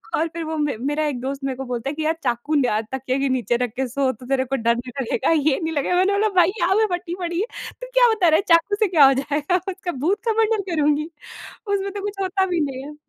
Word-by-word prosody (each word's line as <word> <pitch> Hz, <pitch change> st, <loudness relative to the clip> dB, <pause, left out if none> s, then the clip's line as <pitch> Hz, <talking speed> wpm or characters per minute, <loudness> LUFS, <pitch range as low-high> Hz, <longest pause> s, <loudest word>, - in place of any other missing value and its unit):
और 320 Hz, -, +1 dB
फिर 335 Hz, 0 st, -4 dB
वो 320 Hz, 0 st, -4 dB
म -, -, 0 dB, 0.3 s
मेरा 305 Hz, +1 st, 0 dB
एक 275 Hz, -4 st, -3 dB
दोस्त 270 Hz, +2 st, -4 dB
मेरे 270 Hz, -1 st, -2 dB
को 265 Hz, -, -4 dB
बोलता 245 Hz, +1 st, -3 dB
है -, -, -3 dB
कि, 315 Hz, -, -3 dB
"यार, 320 Hz, +1 st, +1 dB
चाकू 240 Hz, +6 st, -1 dB
ले 275 Hz, -4 st, +3 dB
आ, 215 Hz, -, +1 dB
तकिए 260 Hz, +3 st, -3 dB
के 275 Hz, 0 st, 0 dB
नीचे 250 Hz, -2 st, 0 dB
रख 245 Hz, -1 st, -2 dB
के 265 Hz, 0 st, -1 dB
सो, 265 Hz, +2 st, 0 dB
तो 250 Hz, 0 st, -13 dB
तेरे 265 Hz, 0 st, +1 dB
को 270 Hz, -, -2 dB
डर 235 Hz, -2 st, +1 dB
नहीं 245 Hz, +1 st, -6 dB
लगेगा, 255 Hz, -, 0 dB, 0.2 s
ये 275 Hz, -, 0 dB
नहीं 320 Hz, 0 st, -2 dB
लगेगा।" 295 Hz, +5 st, 0 dB
मैंने 375 Hz, +2 st, +3 dB
बोला, 425 Hz, +2 st, +2 dB
"भई, 345 Hz, +2 st, +3 dB
यहाँ 380 Hz, +3 st, +2 dB
पे 440 Hz, -, +4 dB
फटी 350 Hz, 0 st, -6 dB
पड़ी 345 Hz, -1 st, -2 dB
है। 435 Hz, +5 st, -5 dB
तू -, -, -6 dB
क्या -, -, +6 dB
बता 390 Hz, -5 st, +2 dB
रहा 315 Hz, -, +4 dB
है, -, -, +1 dB
चाकू 335 Hz, +5 st, +3 dB
से 430 Hz, -, +3 dB
क्या 320 Hz, -6 st, +6 dB
हो 270 Hz, -, +6 dB
जाएगा? 295 Hz, +6 st, 0 dB
उसका 365 Hz, -1 st, -5 dB
भूत 395 Hz, +5 st, +2 dB
का 455 Hz, -, +2 dB
मर्डर 440 Hz, -1 st, +1 dB
करुँगी, 300 Hz, 0 st, +1 dB, 0.6 s
उसमें 395 Hz, -1 st, -1 dB
तो 410 Hz, -, -5 dB
कुछ 405 Hz, -1 st, -5 dB
होता 380 Hz, 0 st, +1 dB
भी 340 Hz, -, +1 dB
नहीं 260 Hz, 0 st, -7 dB
है।" 295 Hz, +1 st, -9 dB
310 Hz, 280 wpm, -22 LUFS, 265-375 Hz, 0.6 s, क्या